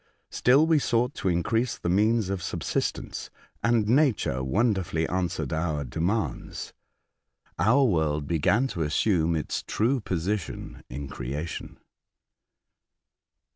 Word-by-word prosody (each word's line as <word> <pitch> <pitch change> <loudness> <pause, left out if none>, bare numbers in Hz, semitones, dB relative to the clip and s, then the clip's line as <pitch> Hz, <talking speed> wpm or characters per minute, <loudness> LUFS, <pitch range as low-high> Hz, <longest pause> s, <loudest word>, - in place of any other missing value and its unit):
Still 135 +5 +4
we 160 -2 +4
sought 125 0 +1
to 95 - -1
increase 110 +8 0
the - - -4
means 105 +3 +2
of 95 -2 -2
subsistence, - - -3 0.3
and 115 -3 +2
nature 120 - +2
wonderfully 95 - +1
answered 90 -2 -2
our 80 -2 -1
demands. 85 - -2 0.9
Our 130 +6 +4
world 80 - +1
began 85 - +2
to 90 -7 -4
assume 80 +1 +2
its 75 - -2
true 125 +5 0
position 95 -1 -3
in 70 +3 -5
creation." 75 +6 -5
95 Hz, 110 wpm, -27 LUFS, 80-115 Hz, 0.9 s, Still